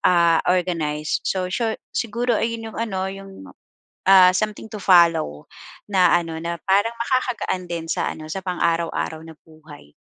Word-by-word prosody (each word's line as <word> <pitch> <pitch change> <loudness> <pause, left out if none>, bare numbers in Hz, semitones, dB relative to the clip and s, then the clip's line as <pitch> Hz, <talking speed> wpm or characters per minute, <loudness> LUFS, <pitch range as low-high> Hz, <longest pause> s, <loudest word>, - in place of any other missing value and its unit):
ah, 170 -2 +4
organized. 165 -4 -1
So, 185 -1 -1
siyo 225 +3 -1 0.2
siguro 235 +1 -1
ayun 225 0 -3
'yong - - -12
ano, 215 -5 -2
'yong, 195 0 -9 0.8
ah, 185 -1 +8
something 215 0 -3
to - - -5
follow, 170 - +3 0.4
na 185 -4 +4
ano, 165 -1 -6
na 170 0 -4
parang 205 +4 +3
makakagaan 240 -6 -1
din 165 -1 -4
sa - - -1
ano, 155 - -10
sa 190 +4 -5
pang-araw-araw 170 -3 -1
na 165 - -11
buhay. 155 - -16
180 Hz, 150 wpm, -22 LUFS, 165-210 Hz, 0.8 s, ah